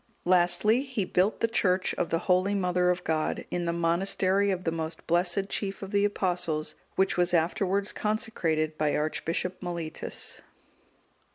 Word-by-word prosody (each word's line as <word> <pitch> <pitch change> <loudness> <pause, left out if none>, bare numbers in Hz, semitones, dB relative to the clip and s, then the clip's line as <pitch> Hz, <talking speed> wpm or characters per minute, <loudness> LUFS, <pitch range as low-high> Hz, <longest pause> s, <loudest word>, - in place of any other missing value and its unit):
Lastly, 180 +6 +3
he 260 -8 -2
built 185 +4 +1
the 230 - +3
church 185 -5 +1
of 170 - -2
the 165 - +1
holy 185 +2 +2
Mother 180 -2 +1
of 180 0 0
God,(197) 155 -1 -1
in 175 -1 -1
the 170 - +1
monastery 185 +3 +1
of 185 -2 -1
the 165 - 0
most 160 0 -5
blessed 175 +3 +1
chief 200 -1 -3
of 195 - -7
the 200 -1 +3
Apostles, 180 -6 -1 0.2
which 190 -1 +2
was 180 0 +2
afterwards 190 +4 +1
consecrated 165 -8 -1
by 150 -1 +1
Archbishop 165 +4 -2
Mellitus. 170 -3 -4
180 Hz, 155 wpm, -28 LUFS, 170-195 Hz, 0.2 s, Lastly